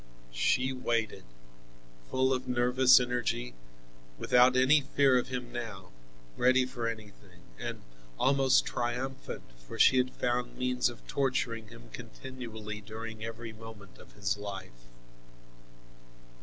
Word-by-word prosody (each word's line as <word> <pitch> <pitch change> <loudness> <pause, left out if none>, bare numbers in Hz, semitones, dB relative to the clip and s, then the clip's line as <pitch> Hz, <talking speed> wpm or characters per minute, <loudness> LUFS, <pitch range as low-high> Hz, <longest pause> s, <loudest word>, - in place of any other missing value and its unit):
She 125 - +2
waited, 120 -4 -1 0.9
full 130 0 +2
of 130 0 -3
nervous 125 +1 +5
energy, 120 - -2 0.6
without 125 - +5
any 140 +4 +5
fear 135 -2 +3
of - - -4
him 125 -2 -5
now, 105 -6 -6 0.4
ready 130 +1 +4
for 120 -2 -4
anything, 110 -3 -9 0.2
and - - -5 0.3
almost 135 -1 +4
triumphant, 125 +3 -3 0.2
for - - -7
she 130 - +6
had 125 0 +3
found 125 -1 -2
means 125 -1 +1
of 120 - -12
torturing 120 -5 -1
him 115 0 -14
continually 115 -3 -8
during 110 +1 -7
every 115 0 -6
moment 110 -3 -12
of - - -16
his 105 0 -2
life. 95 -13 -8
120 Hz, 120 wpm, -30 LUFS, 110-130 Hz, 0.9 s, she